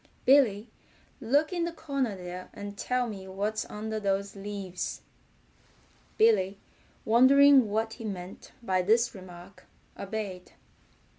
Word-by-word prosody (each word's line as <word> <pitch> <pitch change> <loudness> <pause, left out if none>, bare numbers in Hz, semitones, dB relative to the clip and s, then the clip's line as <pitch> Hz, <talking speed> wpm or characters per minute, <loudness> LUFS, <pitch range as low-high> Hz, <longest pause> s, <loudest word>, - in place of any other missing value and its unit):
Billy, 245 -6 +4 0.5
look 285 +8 +1
in 345 -1 -1
the 340 - -2
corner 275 -9 -3
there 180 0 -8
and 205 0 -7
tell 250 +4 -1
me 195 -4 -8
what's 205 +3 -3
under 220 +1 -4
those 200 0 -1
leaves." 195 -2 -5 1.2
Billy 200 -3 +3 0.5
wondering 260 +1 +6
what 220 +2 -1
he 235 - -10
meant 190 -3 -7
by 185 -4 +1
this 230 +5 +2
remark 185 -1 -13 0.3
obeyed. 200 -3 -6
210 Hz, 120 wpm, -28 LUFS, 195-240 Hz, 1.2 s, wondering